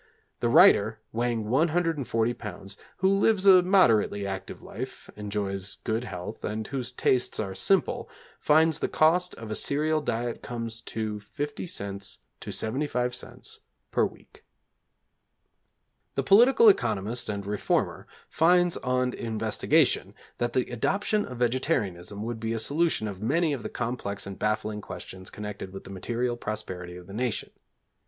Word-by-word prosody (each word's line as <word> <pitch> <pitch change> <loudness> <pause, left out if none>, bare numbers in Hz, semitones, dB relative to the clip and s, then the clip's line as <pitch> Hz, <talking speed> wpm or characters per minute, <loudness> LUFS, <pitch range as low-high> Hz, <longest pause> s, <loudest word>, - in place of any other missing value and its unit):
The 120 - +1
writer, 115 - +6
weighing 115 -2 -1
140 145 -4 +1
lbs., 100 -3 -7 0.2
who 190 - +2
lives 195 0 +3
a 185 -2 +9
moderately 120 - +3
active 95 -1 -6
life, - - -8
enjoys 100 -2 -3
good 115 +2 -1
health, 90 +1 -7
and 110 +1 -3
whose 125 -2 -4
tastes 125 0 +1
are 100 -3 -2
simple, 195 - +1 0.3
finds 160 +1 +4
the - - 0
cost 175 +3 +3
of 115 -2 -8
a - - -1
cereal 155 +2 +1
diet 120 -4 -2
comes 115 -1 -5
to 110 -1 -2
50c. 100 - -5 0.2
to - - -8
75c. 125 +1 -2 0.3
per - - +2
week. - - -7 1.7
The 135 - 0
political 230 - +6
economist 115 - +2
and 100 -2 -3
reformer 105 0 -1 0.2
finds 175 +1 +3
on 125 0 0
investigation, 110 -1 +1 0.2
that 120 0 -1
the 130 - +2
adoption 205 - 0
of 125 - -7
vegetarianism 105 - -1
would 115 0 -4
be 110 0 -2
a - - -1
solution 145 0 +1
of 100 -2 -7
many 155 +7 +1
of 135 - -4
the - - -5
complex 115 -4 -3
and 100 -1 -8
baffling 105 0 -1
questions 95 -2 -8
connected 105 -2 -7
with 95 - -8
the - - -10
material 120 +5 -2
prosperity 95 -6 -5
of 90 - -11
the 100 - -11
nation. 120 +1 -2
115 Hz, 140 wpm, -27 LUFS, 105-150 Hz, 1.7 s, a